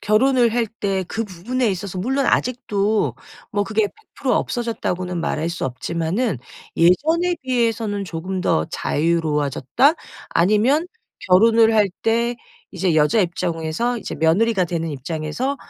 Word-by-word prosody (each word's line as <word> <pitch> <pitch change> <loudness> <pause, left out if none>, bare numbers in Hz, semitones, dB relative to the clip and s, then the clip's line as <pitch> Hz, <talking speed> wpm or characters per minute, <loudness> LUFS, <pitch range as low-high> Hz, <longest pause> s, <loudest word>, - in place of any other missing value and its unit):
결혼을 240 +2 +3
할 235 -2 +1
때 195 -3 -2
그 225 0 -2
부분에 220 +6 -2
있어서 190 0 -4
물론 265 +7 0
아직도 215 -4 0 0.4
뭐 205 0 0
그게 215 0 +1 0.3
"100% - - -1
없어졌다."고는 185 -7 -2
말할 160 0 -1
수 170 - -4
없지만은 165 - -2 0.4
'예전에 320 - +3
비해서는 225 -5 0
조금 185 +2 -4
더 80 - +1
자유로워졌다.' 155 - +1 0.3
아니면 215 - +2 0.4
결혼을 225 +4 +5
할 210 -2 +4
때 235 +1 +1 0.3
이제 185 -3 0
여자 155 +8 +3
입장에서 175 +6 -1
이제 - - -6
며느리가 190 +5 +2
되는 165 -1 -3
입장에서 155 - -3
200 Hz, 295 characters per minute, -21 LUFS, 170-235 Hz, 0.4 s, 결혼을